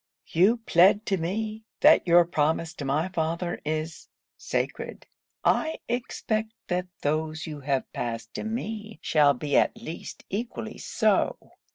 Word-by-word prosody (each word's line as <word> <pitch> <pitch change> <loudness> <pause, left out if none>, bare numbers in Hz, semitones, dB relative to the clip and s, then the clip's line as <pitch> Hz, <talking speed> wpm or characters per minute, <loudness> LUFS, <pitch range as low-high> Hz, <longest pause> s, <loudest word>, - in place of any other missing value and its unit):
You 195 +8 +4
plead 195 +5 +5
to 195 - +1
me, 215 +6 -3 0.2
that - - +6
your 175 0 +7
promise 160 0 0
to 145 - -6
my 150 +6 0
father 170 0 -2
is 155 +1 -3 0.3
sacred. - - -3 0.4
I 315 0 +2
expect 225 -2 -2 0.2
that 180 0 0 0.2
those 155 +1 -1
you 150 -2 -6
have 135 -1 -2
passed 115 -1 -4
to - - -4
me 220 -1 -4
shall 145 -2 +4
be 145 +3 -2
at - - +3
least 170 -8 -8
equally 225 +5 -4
so. - - +1
170 Hz, 140 wpm, -27 LUFS, 155-215 Hz, 0.4 s, your